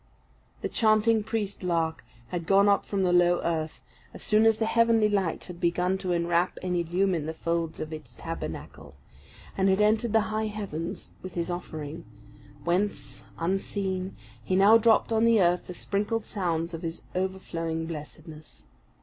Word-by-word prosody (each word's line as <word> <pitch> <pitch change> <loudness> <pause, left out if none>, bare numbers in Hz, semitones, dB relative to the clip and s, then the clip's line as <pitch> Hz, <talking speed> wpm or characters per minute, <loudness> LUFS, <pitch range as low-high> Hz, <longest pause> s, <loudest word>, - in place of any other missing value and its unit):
The - - +1
chanting 220 0 +3
priest 210 -2 -3
lark 165 -5 -1 0.3
had 170 -2 -4
gone 200 +1 +5
up 200 0 +4
from 195 -2 0
the 180 -1 +2
low 175 0 +4
earth, 160 -2 -2 0.4
as - - -7
soon 215 +1 +4
as 225 -1 +4
the 220 - 0
heavenly 230 -1 +4
light 195 -5 0
had 175 -2 -9
begun 180 +2 +1
to 185 -2 -2
enwrap 170 +1 +1
and 180 -1 -1
illumine 175 -1 0
the 160 - -4
folds 165 -1 -2
of 155 0 -5
its 155 -1 -9
tabernacle; 165 - -7 0.6
and 195 0 +2
had 190 +1 +3
entered 215 +2 +3
the 220 0 +4
high 220 0 0
heavens 195 -6 -5
with 185 - -8
his 170 0 -2
offering, 160 -2 -6 0.6
whence, 155 - -1
unseen, 190 - -2 0.3
he 185 - 0
now 200 +4 +7
dropped 230 0 +3
on 225 0 +3
the 230 -1 +5
earth 175 -1 +2
the 180 - -7
sprinkled 210 +4 -1
sounds 170 -4 -2
of 165 - -5
his 165 -1 -5
overflowing 170 -3 -2
blessedness. 155 0 -9
180 Hz, 165 wpm, -27 LUFS, 165-205 Hz, 0.6 s, now